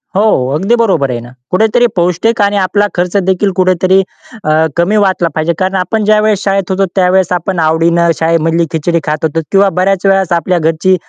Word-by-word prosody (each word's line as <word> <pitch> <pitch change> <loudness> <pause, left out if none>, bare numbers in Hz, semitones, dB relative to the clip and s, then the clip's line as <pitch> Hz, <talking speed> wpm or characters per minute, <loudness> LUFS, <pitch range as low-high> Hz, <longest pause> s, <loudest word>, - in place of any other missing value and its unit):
हो, 205 - +2 0.3
अगदी 195 +9 +1
बरोबर 190 - 0
आहे 120 - -3
ना, 120 - -12 0.2
कुठेतरी 220 +5 +2
पौष्टिक 180 +6 0
आणि 205 0 +1
आपला 205 +2 +1
खर्च 180 +2 -2
देखील 190 +1 0
कुठेतरी 185 +1 +2 0.4
अ, 155 - +1 0.3
कमी 180 +5 +1
वाटला 185 -3 0
पाहिजे. 160 +2 0
कारण 190 +1 -1
आपण 190 +4 -1
ज्यावेळेस 215 -1 +2
शाळेत 195 -1 -1
होतो 195 +1 +1
त्यावेळेस 185 -1 +2
आपण 180 0 -2
आवडीनं 165 +2 +2
शाळेमधली 165 0 +1
खिचडी 170 +1 -1
खात 150 +1 -3
होतो 160 +1 -1
किंवा 195 0 +3
बऱ्याच 195 0 0
वेळेस 195 -2 +2
आपल्या 180 +1 -1
घरची 170 +4 +1
185 Hz, 180 wpm, -12 LUFS, 170-195 Hz, 0.4 s, किंवा